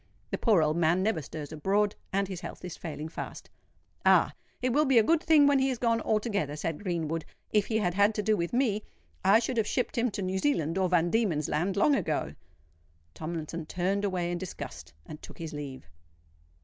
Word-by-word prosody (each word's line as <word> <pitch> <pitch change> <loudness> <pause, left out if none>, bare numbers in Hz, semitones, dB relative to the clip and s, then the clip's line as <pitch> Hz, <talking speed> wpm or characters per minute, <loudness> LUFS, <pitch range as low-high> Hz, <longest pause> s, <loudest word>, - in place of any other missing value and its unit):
"The - - -1
poor 205 -9 +4
old 155 +2 +1
man 170 +2 +3
never 200 -6 +1
stirs 150 +1 -7
abroad; 200 +6 +1 0.2
and 195 0 +1
his 185 -2 -6
health - - -8
is 180 - -6
failing 155 -1 -6
fast." 160 - -8 0.5
"Ah! - - +5 0.3
it 250 -1 0
will 300 +3 +4
be 265 -3 +4
a 225 - +7
good 325 +7 +3
thing 315 -4 +5
when 285 -1 +4
he 265 0 +2
is 255 - -1
gone 230 -1 +1
altogether," 210 - 0
said 155 +2 -3
Greenwood. 165 -4 -2 0.3
"If 210 -2 +2
he 220 - +1
had 180 -5 0
had 205 +3 +3
to 210 - -1
do 215 +1 +3
with 170 -3 -2
me, 235 -4 +1 0.4
I 195 +3 +6
should 240 +2 -1
have 220 -2 +2
shipped 250 - -1
him 245 +1 +2
to 200 -2 -4
New 185 +1 -1
Zealand 175 - +1
or 185 -1 +2
Van 175 -1 +2
Diemen's 180 -10 +1
Land 185 +5 0
long 290 +8 +4
ago." 155 - -1 0.8
Tomlinson 160 - -5
turned 190 +4 -1
away 180 -3 -1
in 175 - -2
disgust, 190 -1 -7
and 155 - -10
took - - -12
his 165 -2 -6
leave. 140 - -7
190 Hz, 210 wpm, -29 LUFS, 165-220 Hz, 0.8 s, a